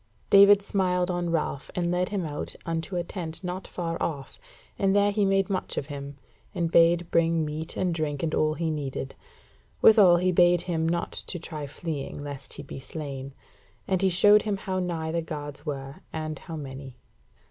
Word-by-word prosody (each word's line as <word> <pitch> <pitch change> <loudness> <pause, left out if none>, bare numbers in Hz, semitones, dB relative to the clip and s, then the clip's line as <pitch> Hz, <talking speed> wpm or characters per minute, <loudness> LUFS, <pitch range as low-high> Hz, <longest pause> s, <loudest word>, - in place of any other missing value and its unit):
David 200 0 +8
smiled 180 -2 0
on 175 -1 -1
Ralph 155 -4 -2
and 175 -1 0
led 180 +1 0
him 195 -4 -2
out 150 -1 -4
unto 165 +2 -3
a 175 - 0
tent 170 -1 -3
not 180 +1 -4
far 165 -2 -4
off, 140 -4 -4 0.4
and 195 -1 +2
there 205 0 +4
he 205 0 +1
made 195 -1 +2
much 190 -2 -3
of - - -1
him, 140 0 -7 0.4
and 170 -2 -1
bade 170 0 +4
bring 165 -1 +2
meat 155 +2 -5
and 180 -2 0
drink 155 -3 -2
and 160 - -1
all 155 0 +2
he 165 -1 -1
needed. 135 -3 -4 0.7
Withal 200 -6 +7
he 185 +1 +2
bade 175 0 +4
him 165 -2 -1
not 170 +1 -1
to 180 - -4
try 155 -3 -6
fleeing, 145 -1 -5
lest 145 -1 -8
he 145 - -7
be 135 - -8
slain; 135 -2 -7 0.5
and 190 -1 +1
he 190 - +4
showed 205 +4 +6
him 210 -2 -2
how 190 -1 -3
nigh 165 -3 -2
the 170 0 0
guards 145 -1 -7
were 135 -1 -5
and 155 -2 -4
how 165 - -8
many. 135 -3 -8
165 Hz, 190 wpm, -27 LUFS, 150-180 Hz, 0.7 s, David